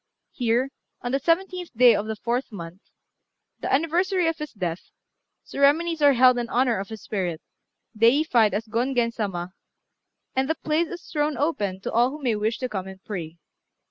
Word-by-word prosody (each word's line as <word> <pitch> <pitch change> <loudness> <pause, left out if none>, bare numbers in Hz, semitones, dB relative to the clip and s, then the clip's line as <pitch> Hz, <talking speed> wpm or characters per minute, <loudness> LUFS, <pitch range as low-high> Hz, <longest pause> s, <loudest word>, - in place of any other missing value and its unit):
Here, 245 +2 0 0.3
on 245 - -2
the 275 - +1
seventeenth 350 - -1
day 245 -1 +8
of 210 0 -1
the 220 - -3
fourth 240 +4 -2
month, 175 -1 -9 0.8
the - - -3
anniversary 345 +6 +2
of 325 0 -1
his 300 0 -5
death, 180 -5 -4 0.5
ceremonies 315 +4 +2
are 285 -1 +6
held 250 0 +5
in 240 0 -3
honour 245 -3 +2
of 195 - -6
his 220 -1 -8
spirit, 180 -6 -2 0.6
deified 230 -2 +4
as 215 +2 -2
Gongen 235 +1 0
Sama, 185 -5 -3 0.8
and 265 +2 +1
the 320 - +2
place 315 +2 0
is 350 +1 -8
thrown 300 -1 0
open 205 - -1
to - - -4
all 240 +2 +3
who 295 +3 -8
may 240 -4 +1
wish 215 +2 -1
to 255 - -3
come 190 -4 -4
and 190 0 -10
pray. 170 -5 -6
245 Hz, 175 wpm, -25 LUFS, 210-295 Hz, 0.8 s, day